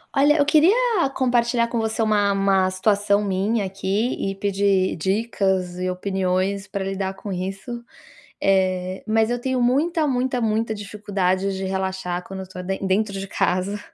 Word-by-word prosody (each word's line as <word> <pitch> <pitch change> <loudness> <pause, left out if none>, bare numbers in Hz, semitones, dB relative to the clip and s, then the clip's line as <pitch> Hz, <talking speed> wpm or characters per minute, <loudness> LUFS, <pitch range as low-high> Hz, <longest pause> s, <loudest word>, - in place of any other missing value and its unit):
Olha, 290 +3 +4
eu 285 - +3
queria 315 +6 +5 0.4
compartilhar 240 -2 +2
com 235 0 -2
você 220 0 -1
uma 210 -2 +2
uma 195 -1 +2
situação 205 +2 +2
minha 200 +2 0
aqui 195 +5 -1 0.2
e - - -7
pedir 195 -1 +1
dicas 190 -1 0
e 185 0 -2
opiniões 190 +1 -1
para 200 0 -3
lidar 195 0 -3
com 200 +1 -8
isso, 195 +6 -5 0.6
eh, 185 -1 +1
mas 220 +1 +2
eu 245 0 -1
tenho 260 0 0
muita, 305 +6 +2
muita, 255 -1 0
muita 220 0 0
dificuldade 195 -2 -1
de 190 - -3
relaxar 190 -2 -2
quando 195 0 -7
eu - - -5
estou 185 0 -8
den 190 +1 -3
dentro 200 +2 +1
de 195 - -5
casa. 190 +2 -1
200 Hz, 160 wpm, -22 LUFS, 190-225 Hz, 0.6 s, queria